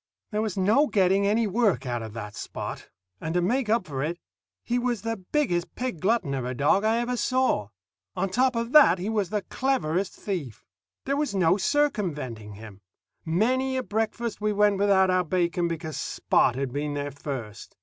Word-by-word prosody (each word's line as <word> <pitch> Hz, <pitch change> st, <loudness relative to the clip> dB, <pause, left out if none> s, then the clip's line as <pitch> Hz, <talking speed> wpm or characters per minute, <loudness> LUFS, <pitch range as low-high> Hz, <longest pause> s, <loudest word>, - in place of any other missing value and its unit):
There 210 Hz, 0 st, 0 dB
was 215 Hz, -3 st, -3 dB
no 215 Hz, +11 st, +4 dB
getting 195 Hz, -2 st, +3 dB
any 220 Hz, +3 st, +2 dB
work 210 Hz, -, +1 dB
out 120 Hz, -2 st, -2 dB
of 110 Hz, -2 st, -7 dB
that 105 Hz, -2 st, -7 dB
Spot; -, -, -6 dB, 0.3 s
and 160 Hz, +2 st, -4 dB
to -, -, +4 dB
make 240 Hz, +4 st, 0 dB
up 225 Hz, -3 st, +2 dB
for 135 Hz, -5 st, -4 dB
it, 165 Hz, +4 st, -2 dB, 0.5 s
he 245 Hz, +1 st, 0 dB
was 240 Hz, -4 st, -1 dB
the 225 Hz, 0 st, -1 dB, 0.2 s
biggest 180 Hz, -, 0 dB
pig 250 Hz, -9 st, -3 dB
glutton 195 Hz, -7 st, +1 dB
of 130 Hz, -2 st, -2 dB
a 125 Hz, +1 st, -3 dB
dog 145 Hz, +9 st, +3 dB
I 220 Hz, +1 st, +2 dB
ever 240 Hz, +1 st, -1 dB
saw. 255 Hz, -, +1 dB, 0.5 s
On -, -, 0 dB
top 250 Hz, +6 st, +1 dB
of 230 Hz, +1 st, -2 dB
that, 275 Hz, -, +7 dB
he 185 Hz, +4 st, -3 dB
was 210 Hz, -5 st, 0 dB
the 210 Hz, -1 st, -2 dB
cleverest 195 Hz, -9 st, -1 dB
thief. 165 Hz, -, -5 dB, 0.4 s
These 275 Hz, -, 0 dB
was 290 Hz, -8 st, -1 dB
no 180 Hz, -2 st, +4 dB
circumventing 165 Hz, -, -1 dB
him. 105 Hz, -1 st, -12 dB, 0.4 s
Many 255 Hz, +10 st, +1 dB
a 255 Hz, -, -1 dB
breakfast 225 Hz, 0 st, -2 dB
we 210 Hz, 0 st, +1 dB
went 205 Hz, -1 st, +3 dB
without 190 Hz, -2 st, +4 dB
our 185 Hz, 0 st, +2 dB
bacon 175 Hz, 0 st, 0 dB
because 160 Hz, -2 st, -4 dB
Spot 120 Hz, -, +1 dB
had 135 Hz, -2 st, -3 dB
been 145 Hz, 0 st, -2 dB
there 145 Hz, 0 st, -3 dB
first. 125 Hz, -7 st, -7 dB
195 Hz, 190 wpm, -26 LUFS, 150-230 Hz, 0.5 s, that